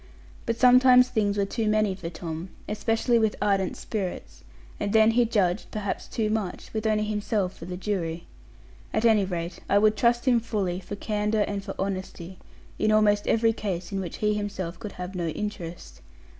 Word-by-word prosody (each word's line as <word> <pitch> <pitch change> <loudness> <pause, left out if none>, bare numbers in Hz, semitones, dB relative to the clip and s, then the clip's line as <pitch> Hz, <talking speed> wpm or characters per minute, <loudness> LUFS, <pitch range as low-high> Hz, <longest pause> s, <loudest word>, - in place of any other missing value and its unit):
But 230 0 0
sometimes 250 0 +6
things 205 -4 0
were 200 - +2
too 220 +2 -2
many 215 -2 +2
for 185 -3 -6
Tom, 165 +1 -6 0.2
especially 225 +3 +1
with 220 -2 +1
ardent 195 -3 +1
spirits, 195 -5 -5 0.4
and 205 0 -2
then 220 0 +6
he 240 +1 +3
judged, 200 -4 0
perhaps 210 -2 -4
too 215 -2 -1
much, 210 -5 -3
with 220 0 -1
only 215 -1 +2
himself 210 -2 -1
for - - -10
the 180 0 -5
jury. 175 -4 -3 0.7
At 220 +1 +1
any 215 -4 +5
rate, 175 -2 -4
I 200 - +4
would 215 +1 +4
trust 240 +3 +2
him 245 -2 +5
fully, 200 -6 -2
for 190 +2 -7
candour 210 0 0
and 200 -1 -3
for 195 -1 -6
honesty, 190 -2 -5 0.4
in 215 - +2
almost 210 -1 +3
every 225 0 +3
case 190 -5 -4
in 195 - -2
which 180 -4 -5
he 210 0 +1
himself 200 -4 -4
could 210 -3 -7
have 180 +1 -6
no 175 -3 -2
interest. 175 -1 -6
205 Hz, 185 wpm, -26 LUFS, 185-220 Hz, 0.7 s, sometimes